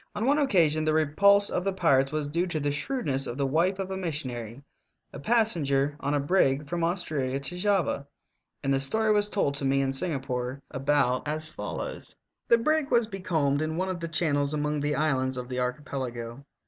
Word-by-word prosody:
On 210 Hz, +2 st, -1 dB
one 285 Hz, +3 st, +3 dB
occasion 165 Hz, -, +3 dB
the 155 Hz, 0 st, +1 dB
repulse 200 Hz, +7 st, +4 dB
of 180 Hz, -, -1 dB
the 195 Hz, 0 st, -1 dB
pirates 140 Hz, -7 st, +2 dB
was 155 Hz, -1 st, -2 dB
due 170 Hz, +5 st, -1 dB
to 165 Hz, -3 st, -2 dB
the 145 Hz, 0 st, -1 dB
shrewdness 145 Hz, -, -2 dB
of 120 Hz, -, -5 dB
the 140 Hz, -, 0 dB
wife 170 Hz, +8 st, +1 dB
of 190 Hz, -1 st, -4 dB
a 190 Hz, -, -3 dB
missionary, 135 Hz, -, -4 dB, 0.5 s
a -, -, -7 dB
passenger 145 Hz, -9 st, +1 dB
on 145 Hz, +1 st, -1 dB
a -, -, +2 dB
brig 140 Hz, -2 st, +2 dB
from 170 Hz, +2 st, -2 dB
Australia 150 Hz, -7 st, -1 dB
to 140 Hz, +6 st, -3 dB
Java, 180 Hz, -7 st, 0 dB, 0.6 s
and 135 Hz, 0 st, +1 dB
the 135 Hz, -, +2 dB
story 215 Hz, +11 st, +3 dB
was 205 Hz, 0 st, +2 dB
told 195 Hz, -9 st, 0 dB
to 140 Hz, 0 st, -2 dB
me 135 Hz, 0 st, +2 dB
in 135 Hz, -1 st, +1 dB
Singapore 135 Hz, -4 st, -2 dB
about 135 Hz, -1 st, +1 dB
as 155 Hz, +1 st, -2 dB
follows: -, -, -5 dB, 0.3 s
The 235 Hz, -, +6 dB
brig 310 Hz, +4 st, +1 dB
was 235 Hz, -2 st, +3 dB
becalmed 160 Hz, -9 st, -1 dB
in 160 Hz, +1 st, -2 dB
one 185 Hz, +1 st, -1 dB
of 185 Hz, -2 st, -3 dB
the 165 Hz, -, -4 dB
channels 150 Hz, -3 st, +1 dB
among 150 Hz, 0 st, -1 dB
the 145 Hz, +1 st, 0 dB
islands 130 Hz, -4 st, 0 dB
of 125 Hz, -1 st, -5 dB
the 125 Hz, 0 st, -3 dB
archipelago. 125 Hz, -2 st, -4 dB
150 Hz, 200 wpm, -27 LUFS, 135-185 Hz, 0.6 s, The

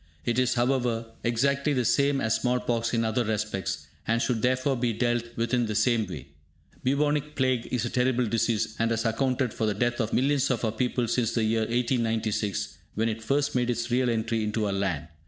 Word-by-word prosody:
It 120 Hz, +1 st, +1 dB
is, 125 Hz, 0 st, +2 dB
however, 120 Hz, -2 st, +1 dB, 0.2 s
exactly 140 Hz, +5 st, +1 dB
the 125 Hz, -3 st, +1 dB
same 140 Hz, +1 st, +2 dB
as 110 Hz, 0 st, +1 dB
small 125 Hz, +2 st, +1 dB
pox 115 Hz, -1 st, -1 dB
in 115 Hz, -1 st, +1 dB
other 110 Hz, +2 st, +1 dB
respects, 105 Hz, -3 st, -2 dB, 0.2 s
and 115 Hz, +1 st, +2 dB
should 120 Hz, -2 st, 0 dB
therefore 130 Hz, +3 st, +1 dB
be 120 Hz, -1 st, 0 dB
dealt 120 Hz, +1 st, 0 dB
with 115 Hz, +2 st, -1 dB
in 120 Hz, -2 st, +2 dB
the 105 Hz, -, -3 dB
same 110 Hz, -1 st, +2 dB
way. 85 Hz, -7 st, -8 dB, 0.5 s
Bubonic 150 Hz, +2 st, +1 dB
Plague 130 Hz, -4 st, +1 dB
is 125 Hz, -1 st, -1 dB
a -, -, -2 dB
terrible 125 Hz, 0 st, +2 dB
disease, 115 Hz, -1 st, 0 dB
and 115 Hz, 0 st, +2 dB
has 115 Hz, 0 st, -1 dB
accounted 125 Hz, +1 st, 0 dB
for 110 Hz, -, -1 dB
the 105 Hz, -, 0 dB
death 120 Hz, +3 st, 0 dB
of 110 Hz, -, -2 dB
millions 140 Hz, +1 st, +2 dB
of 125 Hz, -2 st, 0 dB
our 110 Hz, -, +1 dB
people 120 Hz, +1 st, -1 dB
since 115 Hz, -1 st, 0 dB
the 115 Hz, -, +1 dB
year 110 Hz, +1 st, +2 dB
1896, 115 Hz, -4 st, -1 dB, 0.2 s
when 110 Hz, +2 st, +1 dB
it 110 Hz, 0 st, -4 dB
first 140 Hz, +5 st, 0 dB
made 125 Hz, -1 st, +1 dB
its 120 Hz, 0 st, -2 dB
real 125 Hz, 0 st, +2 dB
entry 115 Hz, -1 st, 0 dB
into 105 Hz, 0 st, -1 dB
our 100 Hz, -, -1 dB
land. 90 Hz, -7 st, -1 dB
120 Hz, 210 wpm, -27 LUFS, 110-125 Hz, 0.5 s, is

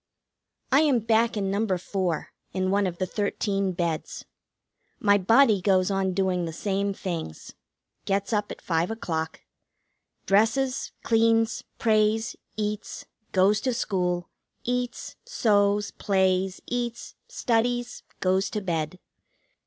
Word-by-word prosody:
I 270 Hz, -, +6 dB
am 295 Hz, -5 st, +4 dB
back 225 Hz, 0 st, +2 dB
in 195 Hz, -2 st, -1 dB
No. 200 Hz, -2 st, +1 dB
4, 180 Hz, -2 st, -2 dB, 0.2 s
in 185 Hz, 0 st, 0 dB
one 200 Hz, 0 st, +2 dB
of 175 Hz, -1 st, -5 dB
the 185 Hz, -, 0 dB
thirteen 200 Hz, 0 st, -1 dB
beds. 170 Hz, -3 st, -3 dB, 0.7 s
My 205 Hz, -1 st, +4 dB
body 220 Hz, +1 st, +5 dB
goes 185 Hz, 0 st, +3 dB
on 195 Hz, -1 st, 0 dB
doing 185 Hz, -2 st, +1 dB
the 165 Hz, -, -4 dB
same 200 Hz, +3 st, -1 dB
things. 170 Hz, -, -5 dB, 0.5 s
Gets 200 Hz, +3 st, 0 dB
up 210 Hz, -1 st, 0 dB
at -, -, -9 dB
five 165 Hz, 0 st, 0 dB
o'clock. 160 Hz, -8 st, -3 dB, 0.8 s
Dresses, 235 Hz, +6 st, +2 dB
cleans, 225 Hz, 0 st, +2 dB
prays, 220 Hz, 0 st, +2 dB, 0.2 s
eats, 210 Hz, 0 st, -3 dB, 0.3 s
goes 200 Hz, +3 st, +3 dB
to 255 Hz, -3 st, 0 dB
school, 180 Hz, -6 st, -1 dB, 0.4 s
eats, 245 Hz, 0 st, -3 dB
sews, 205 Hz, -2 st, +2 dB
plays, 190 Hz, -1 st, +1 dB
eats, 240 Hz, -1 st, -3 dB
studies, 245 Hz, -, 0 dB, 0.2 s
goes 190 Hz, +1 st, +2 dB
to 210 Hz, -, -2 dB
bed. 165 Hz, -2 st, -2 dB
200 Hz, 120 wpm, -26 LUFS, 185-225 Hz, 0.8 s, I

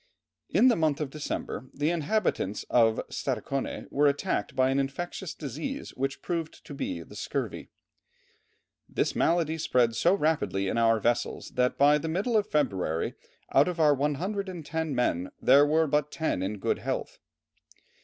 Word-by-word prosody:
In 255 Hz, -, +5 dB
the 245 Hz, -, +5 dB
month 155 Hz, -3 st, +1 dB
of 150 Hz, -3 st, -3 dB
December 145 Hz, -3 st, -5 dB
the 150 Hz, +3 st, +1 dB
inhabitants 165 Hz, -, 0 dB
of 115 Hz, -2 st, +4 dB
Stadaconé 135 Hz, -1 st, -3 dB
were 145 Hz, +1 st, +3 dB
attacked 140 Hz, -7 st, -1 dB
by 130 Hz, 0 st, +3 dB
an 135 Hz, -, +1 dB
infectious 155 Hz, +6 st, -4 dB
disease 160 Hz, -, -5 dB
which 135 Hz, +1 st, -3 dB
proved 165 Hz, -3 st, -4 dB
to -, -, -8 dB
be 85 Hz, -10 st, -4 dB
the -, -, -14 dB
scurvy. -, -, -4 dB, 1.2 s
"This -, -, -1 dB
malady 165 Hz, -1 st, +1 dB
spread 125 Hz, -6 st, +2 dB
so 175 Hz, -, +3 dB
rapidly 150 Hz, -, 0 dB
in 115 Hz, -, 0 dB
our 115 Hz, -1 st, +4 dB
vessels 120 Hz, +3 st, -1 dB
that 125 Hz, 0 st, 0 dB
by 145 Hz, +1 st, +5 dB
the 160 Hz, -, -4 dB
middle 200 Hz, +8 st, 0 dB
of 210 Hz, -1 st, +2 dB
February 95 Hz, -, 0 dB, 0.4 s
out 140 Hz, +2 st, +5 dB
of 175 Hz, -2 st, -3 dB
our 150 Hz, -2 st, +5 dB
110 160 Hz, +1 st, -2 dB
men 90 Hz, -7 st, 0 dB
there 140 Hz, +3 st, +6 dB
were 160 Hz, +2 st, +3 dB
but 150 Hz, 0 st, 0 dB
ten 160 Hz, -, -1 dB
in 100 Hz, +3 st, -2 dB
good -, -, -1 dB
health." -, -, -4 dB
145 Hz, 155 wpm, -28 LUFS, 125-160 Hz, 1.2 s, there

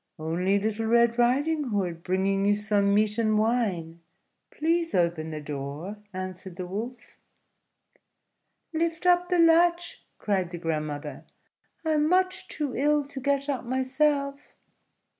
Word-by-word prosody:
"Only 175 Hz, +5 st, 0 dB
little 220 Hz, +2 st, -1 dB
Red 235 Hz, +1 st, +3 dB
Riding 290 Hz, +6 st, +2 dB
Hood, 190 Hz, -8 st, -2 dB
bringing 190 Hz, +2 st, 0 dB
you 205 Hz, +1 st, +3 dB
some 205 Hz, -1 st, +2 dB
meat 210 Hz, +2 st, +2 dB
and 215 Hz, -1 st, +2 dB
wine; 200 Hz, -8 st, 0 dB, 0.5 s
please 330 Hz, +2 st, 0 dB
open 170 Hz, -2 st, +1 dB
the 155 Hz, -1 st, -5 dB
door," 150 Hz, +6 st, -6 dB
answered 185 Hz, -1 st, -7 dB
the 180 Hz, 0 st, -5 dB
Wolf. 225 Hz, +7 st, -7 dB, 1.6 s
"Lift 330 Hz, +1 st, -1 dB
up 355 Hz, 0 st, +4 dB
the 360 Hz, -, +2 dB
latch," 340 Hz, +1 st, +3 dB
cried 190 Hz, -4 st, -1 dB
the 175 Hz, -, -6 dB
grandmother; 155 Hz, -3 st, -4 dB, 0.6 s
"I 320 Hz, -, +1 dB
am 305 Hz, 0 st, +2 dB
much 370 Hz, +1 st, +1 dB
too 290 Hz, -4 st, -4 dB
ill 295 Hz, +2 st, +2 dB
to 280 Hz, -1 st, -8 dB
get 280 Hz, +1 st, 0 dB
up 275 Hz, -3 st, -2 dB
myself." 280 Hz, +3 st, -1 dB
220 Hz, 135 wpm, -27 LUFS, 185-290 Hz, 1.6 s, up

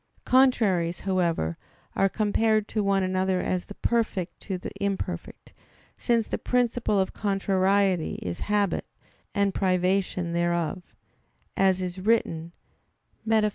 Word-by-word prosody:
Contraries, 205 Hz, -10 st, +3 dB
however, 170 Hz, -, 0 dB, 0.4 s
are 195 Hz, -, +3 dB
compared 215 Hz, +1 st, +1 dB
to 215 Hz, -, -1 dB
one 195 Hz, -1 st, +2 dB
another 185 Hz, 0 st, 0 dB
as 180 Hz, 0 st, -2 dB
the 205 Hz, -, -9 dB
perfect 215 Hz, -6 st, -1 dB
to 190 Hz, -2 st, -4 dB
the 180 Hz, -, -7 dB
imperfect, 185 Hz, -3 st, -4 dB, 0.4 s
since 230 Hz, -3 st, +1 dB
the -, -, -3 dB
"principle 245 Hz, -4 st, +1 dB
of 190 Hz, -, 0 dB
contrariety 195 Hz, -2 st, +1 dB
is 85 Hz, -1 st, -5 dB
habit, 205 Hz, -2 st, +1 dB, 0.5 s
and 200 Hz, -1 st, +2 dB
privation 185 Hz, -2 st, 0 dB
thereof," 170 Hz, +1 st, -1 dB, 0.6 s
as 190 Hz, -1 st, +2 dB
is 180 Hz, +1 st, -4 dB
written, 180 Hz, -6 st, 0 dB, 0.8 s
_Metaph. 220 Hz, -1 st, +3 dB
190 Hz, 120 wpm, -26 LUFS, 180-210 Hz, 0.8 s, Contraries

